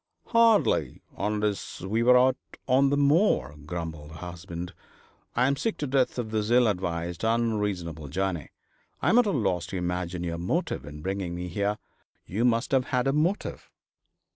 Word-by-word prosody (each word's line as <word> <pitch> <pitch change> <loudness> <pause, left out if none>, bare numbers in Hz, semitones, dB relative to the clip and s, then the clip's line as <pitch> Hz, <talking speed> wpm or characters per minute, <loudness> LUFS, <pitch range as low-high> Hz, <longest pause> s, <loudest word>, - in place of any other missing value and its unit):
'Hardly, 225 - +3
unless 105 -1 -2
we 105 +5 0
were 125 +1 +6
out 130 +1 +4 0.3
on 135 +2 +4
the 145 - +1
moor,' 145 - +3
grumbled 80 -3 -5
her - - -9
husband. 90 +1 -7 0.6
'I 125 - +3
am 140 - +1
sick 225 +9 -2
to 150 - -2
death 130 -2 +1
of 115 -3 -3
this 110 -1 -1
ill 120 +1 +5
advised, 85 -3 -2
unreasonable 105 -9 -1
journey. 90 -1 -2 0.5
I - - +1
am 235 - +6
at 245 - +3
a - - +2
loss 90 - 0
to 95 - -4
imagine 90 0 -2
your 85 -1 -3
motive 80 -5 -2
in 75 +1 -9
bringing 95 -2 -2
me 90 +1 -4
here. 100 +4 -1 0.5
You 110 +7 -1
must 115 0 +2
have 130 -2 +3
had 125 0 0
a 135 - +2
motive.' 165 +7 -1
105 Hz, 170 wpm, -27 LUFS, 85-125 Hz, 0.6 s, were